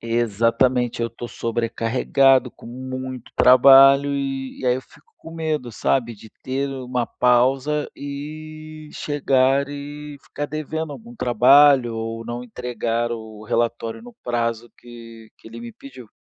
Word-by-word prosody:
Exatamente. 115 +2 0
Eu 115 - -2
tô 120 +1 -8
sobrecarregado, 120 +3 +1
com - - -15
muito 130 0 -7
trabalho, 135 +2 +7
e 135 -1 -4
e 130 - -3
aí 125 - +3
eu - - -5
fico - - -23
com 165 - -12
medo, 155 -7 -3
sabe, 120 +1 -1
de 110 +1 -15
ter 135 +2 -2
uma 125 -2 -3
pausa 130 +4 +1
e 155 +2 -9
chegar 135 -1 +1
e 145 +1 -8
ficar 145 - -6
devendo 155 0 -5
algum 235 +8 -12
trabalho, 125 - +5
ou 115 0 -5
não 120 +1 -6
entregar 120 -1 -3
o 110 -2 -8
relatório 115 - -2
no 245 0 -13
prazo 120 -1 -2
que 115 -2 -13
que - - -15
ele 115 +1 -10
me 120 0 -9
pediu. 130 -4 -13
130 Hz, 140 wpm, -21 LUFS, 115-140 Hz, -, trabalho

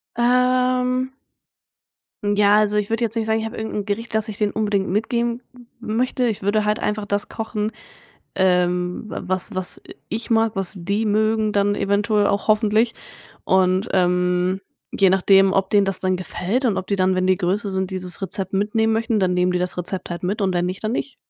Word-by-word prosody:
Ähm. 250 +1 +2 1.1
Ja, 205 0 +4
also 210 0 +2
ich 210 +1 -1
würde 230 +1 0
jetzt 225 -1 -1
nicht 225 -1 -1
sagen, 220 0 +1
ich 220 - -3
habe - - -8
irgend 220 0 -4
'n 205 -1 -3
Gericht, 220 +3 -4
dass 220 +1 +1
ich 210 - -7
denen 210 -1 0
unbedingt 205 -3 0
mitgeben 235 +4 -1 0.4
m 215 - -4
möchte. 250 +1 0
Ich 215 -4 -3
würde 210 +2 +1
halt 210 0 +1
einfach 210 0 -2
das 205 0 -1
kochen, 220 -1 -3 0.6
ähm, 180 0 +1
wa - - -5
was 185 +3 -2
was 185 -1 -4
i - - -11
ich 225 +2 -4
mag, 225 -1 +2
was 195 +1 -2
die 200 +5 -1
mögen 215 +1 +1
dann 205 0 +1
eventuell 205 +1 +1
auch 200 +1 -1
hoffentlich 215 +2 +3 0.5
und, 185 +2 +2
ähm, 180 0 +1 0.3
je 195 - +3
nachdem, 195 +1 +4
ob 195 0 0
denen 205 -1 +4
das 195 -1 -2
dann 185 -1 +1
gefällt 185 +7 -2
und 220 -6 +2
ob 185 - -6
die 200 - +1
dann, 185 0 +2
wenn 185 0 0
die 185 - +4
größer 200 +3 -1
sind, 190 0 -2
dieses 180 -2 -4
Rezept 195 -1 -3
mitnehmen 215 +3 +1
möchten, 225 -1 0
dann 185 -1 +1
nehmen 180 0 +2
die 180 - 0
das 180 0 -3
Rezept 180 +1 -5
halt 175 +1 -5
mit 205 +4 -1
und 190 -1 +1
wenn 175 0 0
nicht, 185 +1 -5
dann 215 +1 -1
nicht. 265 +1 -3
205 Hz, 205 wpm, -21 LUFS, 185-220 Hz, 1.1 s, Ja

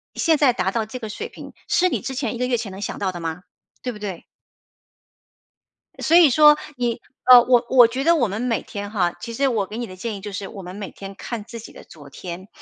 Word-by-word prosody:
现 325 -2 +3
在 280 -4 +4
达 190 -4 -1
到 225 +2 -1
这 235 +4 -8
个 220 - -6
水 210 - -6
平， - - -11 0.2
是 365 - +3
你 - - -2
之 265 - -4
前 250 -3 -2
1 - - -6
个 250 - 0
月 250 -1 +1
前 225 -3 -5
能 190 +1 -9
想 - - -4
到 190 -2 -1
的 175 - -7
吗？ 165 +2 -4 0.4
对 250 - -3
不 210 - -10
对？ 195 -5 -6 1.8
所 330 - +4
以 330 -6 +8
说， 300 +2 +7 0.2
你， 240 -2 -2 0.2
呃， 250 -1 +9
我 245 -1 +3
我 250 -3 +7
觉 255 +4 -3
得 335 +3 +4
我 245 - +2
们 205 +2 -4
每 245 -2 -1
天 205 0 -7
哈 180 -5 0
其 230 - -7
实 275 +4 +1
我 215 -6 0
给 215 - -8
你 240 0 -3
的 185 - -10
建 210 +3 -5
议 - - -9
就 205 - -6
是 195 0 -5
我 195 -3 -9
们 180 +1 -8
每 205 -1 -6
天 195 0 -10
看 225 +2 -6
自 230 +1 -9
己 - - -12
的 - - -13
昨 145 -3 -14
天。 180 +6 -8
225 Hz, 270 characters per minute, -22 LUFS, 195-250 Hz, 1.8 s, 呃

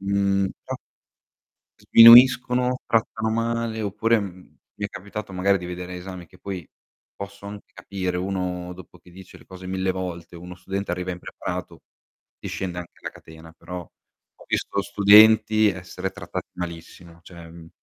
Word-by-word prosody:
Mhmm, 100 -1 +1 0.2
pro - - -4 1.0
Sminuiscono, 125 +2 +7
trattano 110 -1 0
male 115 0 -1
oppure, 105 +2 +1
mhmm, 95 -2 -10 0.2
mi 105 - -5
è - - +1
capitato 100 +1 -8
magari 95 +2 +2
di 90 - -7
vedere 90 0 -6
esami 90 -1 -8
che - - -20
poi 95 -5 -6 0.5
posso 100 0 -9
anche 100 0 -10
capire 95 -2 -4
uno 90 -1 -3
dopo 95 -2 -14
che 90 - -20
dice 95 +1 -14
le - - -19
cose 95 0 -11
1000 95 0 -1
volte 90 -2 -6
uno 90 +1 -9
studente 95 +2 -5
arriva 90 0 -3
impreparato, 90 0 -6 0.6
ti - - -7
scende 90 -2 -4
anche 90 -1 -10
la - - -5
catena 80 0 -15
però 90 +1 -7
ho 85 - -20
visto 100 - -1
studenti 110 +2 +6
essere 95 0 -4
trattati - - -7
malissimo, 85 -1 -9
cioè, 85 -1 -12
mhmm 80 -1 -13
95 Hz, 150 wpm, -23 LUFS, 90-105 Hz, 1.0 s, Sminuiscono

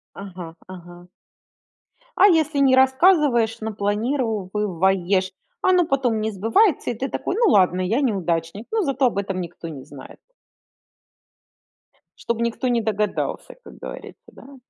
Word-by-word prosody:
Ага 180 -4 -9
ага. 175 -1 -12 1.1
А 400 - +7
если 315 -5 +2
не 265 -2 +5
рассказываешь, 265 -4 +3
но 220 0 -5
планируешь. 200 - -1 0.3
Оно 365 -2 +3
потом 255 -7 0
не 220 0 -1
сбывается 230 - +1
и - - -3
ты 265 +4 -4
такой: - - -3
ну 455 -1 +3
ладно, 185 -2 +3
я 215 +8 0
неудачник, 185 - -2
но 440 -2 +1
зато 275 -4 +1
об 210 - -3
этом 195 -2 -2
никто 170 -1 -8
не 145 -5 -8
знает. 135 -1 -13 2.1
Чтоб 235 -1 -1
никто 235 +2 -1
не 235 -1 +1
догадался, 210 -1 -2
как - - -13
говорится, - - -10
да? 275 +1 -14
220 Hz, 135 wpm, -22 LUFS, 185-265 Hz, 2.1 s, А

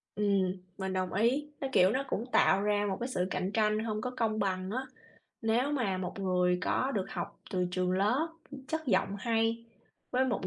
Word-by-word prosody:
Ừm, 200 -3 +2 0.2
mình 190 -1 -3
đồng 185 -1 -1
ý. 260 +9 +1
Nó, 270 - 0
kiểu, 185 -4 +5
nó 265 +4 0
cũng 225 - -2
tạo 195 +1 +5
ra 205 0 +2
một 190 - -1
cái 245 +2 -3
sự 180 -6 0
cạnh 185 - -1
tranh 215 -1 +2
hông 215 -1 -2
có 250 +3 -3
công 220 -2 +1
bằng 190 -1 -1
á. 260 +3 -1 0.6
Nếu 240 +6 +2
mà 200 -9 0
một 185 +1 -4
người 180 -2 +2
có 265 - +1
được 195 -2 0
học - - -5
từ 180 -1 +1
trường 180 0 0
lớp, 220 - +2 0.4
chất 320 -2 -2
giọng 195 -2 +2
hay 230 +1 0 0.5
với 260 +1 +2
một 250 - -1
210 Hz, 200 wpm, -31 LUFS, 190-235 Hz, 0.6 s, kiểu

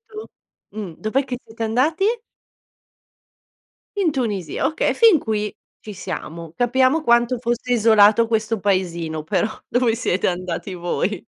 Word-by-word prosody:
tu. 430 - -10 0.6
Mh. 200 -7 -6
Dov'è 255 +6 0
che 250 -2 -5
siete 225 +1 -9
andati? 290 - +1 1.9
In 355 -5 +2
Tunisia, 205 - -2
okay, 315 - 0
e - - -1
fin 445 -9 +6
qui 210 -3 -2 0.3
ci 210 -2 -9
siamo. 165 -3 -7
Capiamo 260 - +2
quanto 240 -1 +3
fosse 240 +1 -2
isolato 220 -1 +5
questo 220 -1 -1
paesino, 170 -5 -1
però 185 +6 0 0.2
dove 245 -2 +2
siete 190 -6 0
andati 180 +2 -4
voi. 175 +2 -2
220 Hz, 130 wpm, -21 LUFS, 185-250 Hz, 1.9 s, fin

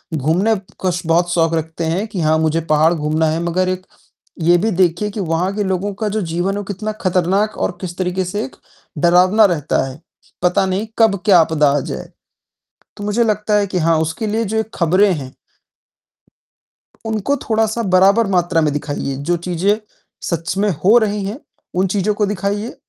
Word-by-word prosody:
घूमने 175 +10 +1 0.3
का 185 -1 +1
श 180 +1 -3
बहुत 175 +1 +2
शौक 165 -1 +2
रखते 160 +1 -3
हैं 185 +7 -1
कि 185 -5 -4
हाँ, 155 0 +3
मुझे 160 +1 +1
पहाड़ 155 +2 +4
घूमना 155 0 0
है 160 +2 -1
मगर 185 +2 0
एक 185 0 -3 0.6
ये 175 +1 +5
भी 220 +5 0
देखिए 180 +3 +1
कि 210 - -6
वहाँ 180 +2 -1
के 210 - 0
लोगों 190 +1 -2
का 210 +1 -3
जो 215 +1 -2
जीवन 175 +3 -1
है - - -3
वो 205 - -3
कितना 205 +2 -4
खतरनाक 190 +3 +1
और 175 - -2
किस 175 -2 -6
तरीके 185 0 -1
से 205 +4 -3
एक 130 - -12 0.4
डरावना 180 +6 +5
रहता 155 -6 0
है। 130 +3 -11 0.4
पता 185 +2 +3
नहीं 195 +4 -2
कब 205 -4 +4
क्या 190 -4 +6
आपदा 155 -3 +3
आ 145 - +1
जाए, - - -6 0.9
तो 205 - -7
मुझे 210 +3 +1
लगता 210 -1 0
है 200 -1 +1
कि 185 - -3
हाँ, 165 -1 +2
उसके 160 +7 -2
लिए 220 +2 -1
जो 220 +3 -2
ये 220 - +2
खबरें 185 +4 +3
हैं 135 -4 -6 1.7
उनको 220 +6 0
थोड़ा 220 0 +3
सा 225 +2 -2
बराबर 195 +3 +4
मात्रा 175 -3 +1
में 150 -1 +1
दिखाइए, 145 -2 -3
जो 165 +6 -1
चीज़ें 180 +5 0 0.5
सच 170 +2 -2
में 205 +1 +2
हो 215 +6 +6
रही 210 -3 0
हैं, 210 +7 -5 0.4
उन 185 +1 +2
चीज़ों 205 +2 0
को 210 0 0
दिखाइए 205 +3 -3
185 Hz, 195 wpm, -18 LUFS, 165-205 Hz, 1.7 s, क्या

